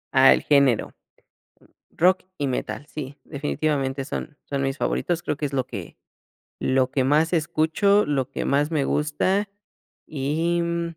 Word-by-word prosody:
Ah, 130 0 +8
el - - -1
género. 140 -5 +3 1.0
Rock 185 +3 +3 0.2
y 145 - -1
metal, 130 +2 -3
sí, 140 -2 -7
definitivamente, 140 -2 -2
son 150 0 -6
son 140 -1 -2
mis 135 +1 -1
favoritos, 175 +3 -1
creo 150 - -2
que 150 - -3
es, 140 - -3
lo 130 -2 -1
que 100 -9 -8 0.6
lo 130 -1 +2
que 135 - +1
más 150 +6 +2
escucho, 170 +5 +2
lo 135 -3 -1
que - - -3
más 145 +3 +1
me 150 -4 +1
gusta 185 +9 0 0.6
y, 160 +4 -1
mm 170 -1 -2
150 Hz, 155 wpm, -24 LUFS, 135-165 Hz, 1.0 s, Ah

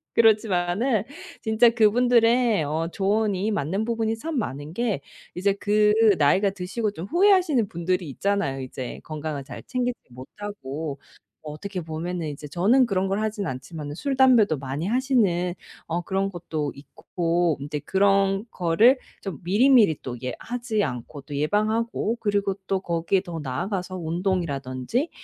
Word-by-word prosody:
그렇지만은 215 0 +3 0.4
진짜 220 +1 +4
그분들의 235 -2 +3
어 160 +3 -1
조언이 205 +1 0
맞는 195 +3 -1
부분이 225 -1 -1
참 310 +4 -4
많은 145 - -5
게 225 - -1 0.3
이제 195 +3 +1
그 210 0 +3 0.2
나이가 185 +8 +3
드시고 200 +3 -3
좀 175 -3 -7
후회하시는 350 - +3
분들이 175 -1 -2
있잖아요 195 -4 -1
이제. 130 -1 -6
건강을 155 -2 -5
잘 - - -9
챙기지 250 -1 -2
못하고 145 -1 -7 0.4
어떻게 180 +5 -6
보면은 165 +1 -4
이제 150 0 -8
저는 210 - +3
그런 195 -4 0
걸 195 +2 0
하진 215 -2 -2
않지만은 145 +2 -6
술, 275 - -2
담배도 240 - +5
많이 140 +6 -4
하시는 215 -8 +1 0.3
어 170 +1 -1
그런 195 +2 -1
것도 165 -5 -4
있고 165 +3 -1
인제 145 +2 -4
그런 195 +1 +2
거를 185 +10 +4 0.2
좀 185 -9 -6
미리미리 210 - +5
또 125 -2 -5
예 125 - -2
하지 235 -3 -2
않고 125 +2 -6
또 145 0 -7
예방하고 215 +8 0
그리고 200 -2 +1
또 195 0 0
거기에 170 +1 0
더 170 -2 -6
나아가서 180 +7 -3
운동이라든지 170 - -2
190 Hz, 315 characters per minute, -24 LUFS, 160-220 Hz, 0.4 s, 담배도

